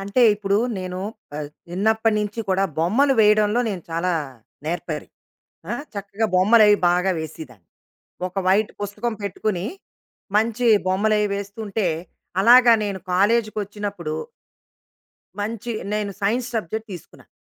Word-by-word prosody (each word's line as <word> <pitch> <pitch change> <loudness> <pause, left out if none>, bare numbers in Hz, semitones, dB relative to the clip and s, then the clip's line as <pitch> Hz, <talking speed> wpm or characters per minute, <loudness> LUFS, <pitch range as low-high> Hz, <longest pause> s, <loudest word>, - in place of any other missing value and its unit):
అంటే, 200 +6 +1
ఇప్పుడు 200 -1 0 0.2
నేను 185 0 -5 0.4
ఆహ్, 150 -1 -4 0.2
చిన్నప్పటి 220 +4 +1
నుంచి 210 +2 -3
కూడా 190 +1 +2
బొమ్మలు 240 - +3
వేయడంలో 210 +2 +4
నేను 180 -4 -5
చాలా 170 +2 0 0.5
నేర్పరి. 165 -2 -4 0.6
ఆహ్, 285 - -3
చక్కగా 200 +2 -2
బొమ్మలు 215 +5 +6
అవి 205 - +6
బాగా 180 +2 +2
వేసిదాన్ని. 140 - -9 0.6
ఒక 185 - -26
వైట్ 205 +3 +3
పుస్తకం 210 +3 -3
పెట్టుకొని, 200 -1 -2 0.7
మంచి 230 +2 +1 0.2
బొమ్మలు 210 +3 +2
అవి 210 - +1
వేస్తుంటే, 200 0 -3 0.6
అలాగా 240 +2 +8
నేను 200 -2 -3
కాలేజ్‌కి 215 +4 +2
వచ్చినప్పుడు... 200 -6 -5 1.3
మంచి 230 +3 -3 0.2
నేను 210 -1 -1
సైన్స్ 235 +5 +1
సబ్జెక్ట్ 220 +3 -4
తీసుకున్నా. 175 - -12
205 Hz, 120 wpm, -22 LUFS, 185-220 Hz, 1.3 s, అలాగా